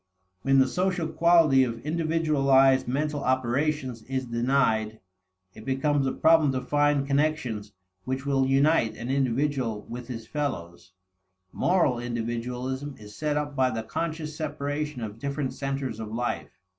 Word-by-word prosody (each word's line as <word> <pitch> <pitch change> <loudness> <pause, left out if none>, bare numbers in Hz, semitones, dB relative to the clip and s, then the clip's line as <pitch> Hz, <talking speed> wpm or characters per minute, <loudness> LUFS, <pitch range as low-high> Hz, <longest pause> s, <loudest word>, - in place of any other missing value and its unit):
When 135 +4 +3
the 135 0 +5
social 180 +3 0
quality 165 -6 +5
of 120 +1 -4
individualized 150 -5 +3
mental 145 +3 -1
operations 130 0 0
is 130 0 -2
denied, 115 -3 +1 0.5
it 110 - -12
becomes 135 +2 +1
a - - +1
problem 160 -3 +4
to 130 - -1
find 145 -1 +2
connections 140 -8 -1 0.3
which 130 +1 -3
will 135 -1 +2
unite 135 -3 +3
an 120 +3 -4
individual 130 -4 0
with 120 0 -8
his 115 -3 -6
fellows. 95 - -5 0.6
Moral 170 -9 +2
individualism 125 +4 -4
is 105 -1 -12
set 150 -1 -1
up 145 -1 -3
by 130 -2 +3
the 115 -2 -3
conscious 155 +4 -4
separation 150 -3 -3
of 110 0 -7
different 140 +1 -3
centers 135 -4 -3
of 110 -1 -6
life. 120 +2 -2
135 Hz, 140 wpm, -26 LUFS, 120-150 Hz, 0.6 s, the